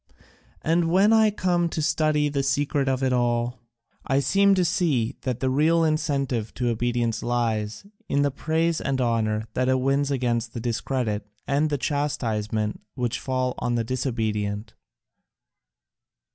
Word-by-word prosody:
And 165 +1 +2
when 195 +5 +4
I 220 -1 +5
come 180 -4 0
to 160 - -4
study 150 -1 +2
the 140 -1 -1
secret 140 0 0
of 130 0 0
it 130 -1 +2
all, 120 0 0 0.4
I 135 0 +1
seem 195 +7 +4
to 185 -2 +2
see 155 -10 +1
that 125 -2 -3
the 130 - +1
real 160 +5 +3
incentive 140 -7 -1
to 120 -1 0
obedience 120 0 -1
lies 115 - -1 0.2
in 140 - +2
the 145 - +1
praise 160 +4 0
and 135 -1 -1
honour 110 -3 +1
that 130 0 +1
it 130 0 +3
wins 135 +2 +1
against 120 -3 -1
the - - -3
discredit 115 -2 -2 0.2
and 145 +2 +1
the 145 - 0
chastisement 110 -8 -2
which 125 -3 -2
fall 130 -1 -1
on 120 -1 -1
the 115 - +1
disobedient." 110 -4 -2
130 Hz, 150 wpm, -25 LUFS, 120-150 Hz, 0.4 s, I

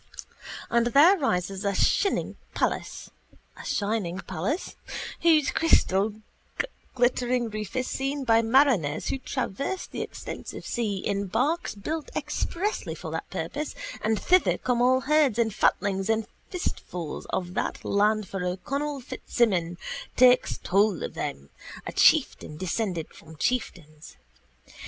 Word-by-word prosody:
And 235 0 +3
there 295 +10 +7
rises 195 - -1
a 200 -1 0
shining 395 - +2 0.2
palace - - -2 2.1
whose 315 -4 +4
crystal 205 -10 +3 0.8
glittering 245 -1 +1
roof 210 -2 -5
is 255 0 0
seen 275 +2 -2
by 225 -2 +4
mariners 230 - +3
who 270 - -1
traverse 270 - -3
the - - -6
extensive - - -7
sea 220 -5 -1
in 200 -1 -1
barks 285 - 0
built 305 +10 -4
expressly 340 +7 -2
for - - -7
that - - -4
purpose, 295 +1 -4 0.3
and 220 0 +1
thither 365 0 +3
come 245 -1 0
all 255 +1 +4
herds 290 -5 +3
and 225 -3 +1
fatlings 195 0 +1
and 225 -1 +2 0.2
firstfruits 180 - -4
of 180 -1 -2
that - - -3
land 210 0 +2
for 195 -1 -4
O'Connell 275 +11 -2
Fitzsimon 185 -8 0 0.4
takes 250 0 +5
toll 200 0 +2
of - - -4
them, 70 +1 -5 0.3
a - - -4
chieftain 150 - +3
descended 185 -1 -2
from 160 - -14
chieftains. 155 - -3
225 Hz, 120 wpm, -27 LUFS, 195-275 Hz, 2.1 s, there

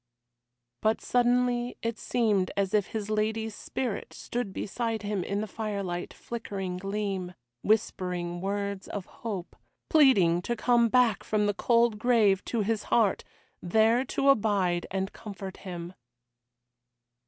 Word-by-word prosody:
But 220 +1 +2
suddenly 245 0 +1
it 230 -1 -2
seemed 210 -6 +1
as 195 -1 0
if 210 -3 +3
his 215 -1 -4
lady's 220 +1 0
spirit 240 0 -4
stood 240 -4 -4
beside 225 +2 -3
him 205 -3 -1
in 200 +3 -2
the 215 - -3
firelight's 200 -4 -4
flickering 195 -6 -5
gleam, 195 -2 -3 0.3
whispering 180 -5 0
words 200 0 -3
of 200 -3 -5
hope, 200 -6 -6 0.4
pleading 200 - +5
to 240 +6 -2
come 235 -1 +3
back 240 -5 +3
from 210 -1 +1
the 205 - +1
cold 230 0 +2
grave 215 -5 +3
to 230 - -1
his 215 +1 -1
heart, 220 -5 +2 0.4
there 220 +7 +3
to 275 +1 +1
abide 200 -8 +2
and 190 +1 -2
comfort 195 -3 -8
him. 175 -2 -7
210 Hz, 130 wpm, -28 LUFS, 190-230 Hz, 0.4 s, pleading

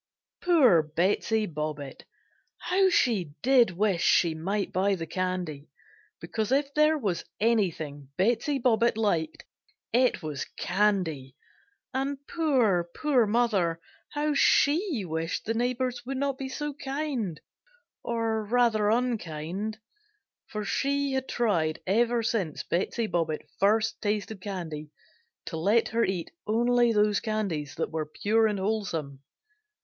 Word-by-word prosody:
Poor 280 - +5
Betsey 190 +8 0
Bobbitt 150 -4 -5 0.5
how 380 +1 +2
she 210 - +1
did 255 -4 +5
wish 185 0 0
she 170 -2 +4
might 195 +6 -2
buy 195 +2 +2
the 165 -3 -5
candy, 175 -4 -3 0.5
because 220 0 -3
if 280 +1 +1
there 305 +1 +4
was 195 - -2 0.2
anything 165 - 0
Betsey 240 +8 +1
Bobbitt 235 -3 +2
liked 170 -8 -1 0.5
it 250 -5 +2
was 150 -3 -4
candy; 180 -9 0 0.6
and 270 +2 -1
poor, 240 - +2
poor 265 -7 +2
mother 205 -7 +1 0.3
how 300 0 0
she 290 - +3
wished 165 0 -3
the 225 - 0
neighbors 245 +1 -1
would 265 +2 -4
not 280 0 0
be 265 -1 -4
so 295 +2 -4
kind, 270 - -3 0.6
or 225 -2 -1
rather 220 -2 +2
unkind, 210 -4 -2 0.7
for 210 -1 -5
she 280 +2 0
had 265 0 -2
tried 165 -10 0
ever 235 +4 +2
since 200 -8 -1
Betsey 200 +6 -1
Bobbitt 165 -6 -2
first 215 +3 +2
tasted 210 -1 -2
candy 165 -6 -5 0.6
to 160 - -5
let 205 +8 +2
her 230 +1 +1
eat 185 -5 -2 0.2
only 240 +2 +3
those 210 -2 +3
candies 200 -10 -3
that - - -3
were 155 -1 -3
pure 220 +8 +2
and 210 -1 -1
wholesome! 175 -9 -2
215 Hz, 125 wpm, -27 LUFS, 170-245 Hz, 0.7 s, Poor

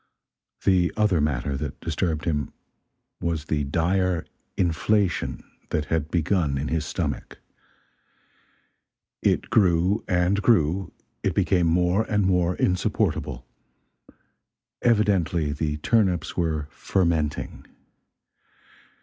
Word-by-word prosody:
The 90 -3 +3
other 105 -7 +3
matter 70 -2 -1
that - - -5
disturbed 80 -4 -2
him 75 -4 -1 0.7
was 80 -3 -2
the 75 -2 -1
dire 90 +3 0 0.3
inflation 95 +2 0 0.3
that 75 -1 -1
had 80 -2 0
begun 85 -4 +1
in 70 +3 -3
his 80 -2 -1
stomach. - - -4 1.8
It - - +1
grew 90 0 +3
and 90 +3 +2
grew, 95 -4 +2 0.3
it - - -1
became 90 -3 +2
more 90 +4 +2
and 105 -2 +2
more 90 -1 +2
insupportable. 75 -8 -1 1.4
Evidently 95 -9 +2
the 75 0 -2
turnips 90 -2 +1
were 80 -4 -1
"fermenting." 80 -3 -1
85 Hz, 100 wpm, -25 LUFS, 75-95 Hz, 1.8 s, The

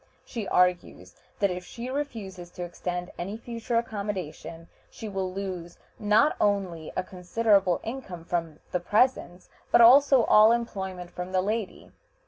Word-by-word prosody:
She 225 -6 -5
argues 175 - 0 0.2
that 200 -2 +1
if 180 0 -5
she 240 +6 -7
refuses 210 -11 -5
to 180 - -6
extend 175 0 -5
any 195 +5 -4
future 230 0 -5
accommodation 200 -7 -4 0.2
she 220 - -8
will 190 -2 -3
lose 185 -3 -6 0.2
not 215 +8 +3
only 190 -6 0
a - - 0
considerable 190 0 +1
income 225 -9 -6
from 165 -3 -3
the 180 - 0
presents, 205 -2 +1 0.2
but - - +5
also 265 +2 +7
all 215 +1 +6
employment 190 -6 -4
from 180 +1 -6
the 185 - +3
lady. 215 0 -4
195 Hz, 140 wpm, -27 LUFS, 180-225 Hz, 0.2 s, also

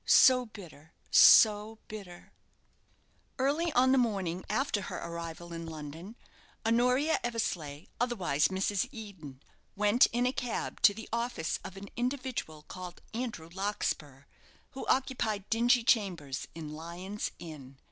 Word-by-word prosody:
so 255 -2 +6
bitter! 165 -7 -13 0.2
so 215 0 +7
bitter!" 195 -5 -10 1.1
Early 295 +6 +1
on 260 +1 +4
the 265 - +5
morning 190 -7 -1
after 215 -1 0
her - - -5
arrival 170 0 -6
in 165 0 -6
London, 160 +6 -8 0.5
Honoria 250 +7 +3
Eversleigh, 175 -11 -3 0.2
otherwise 195 - +1
Mrs. 190 +1 -1
Eden, 190 - -10 0.3
went 210 +4 +5
in 240 +1 0
a 250 - +1
cab 245 -4 -3
to 205 -4 +6
the 220 - -8
office 235 -8 -1
of 190 - -8
an 200 0 -9
individual 250 - -3
called 180 +2 -9
Andrew 225 -9 -4
Larkspur, 160 -8 -3 0.5
who 265 - -7
occupied 230 -6 0
dingy 240 +2 +4
chambers 175 - 0
in 155 -2 -7
Lyon's 175 +6 -5
Inn. 140 -5 -10
205 Hz, 125 wpm, -31 LUFS, 165-240 Hz, 1.1 s, so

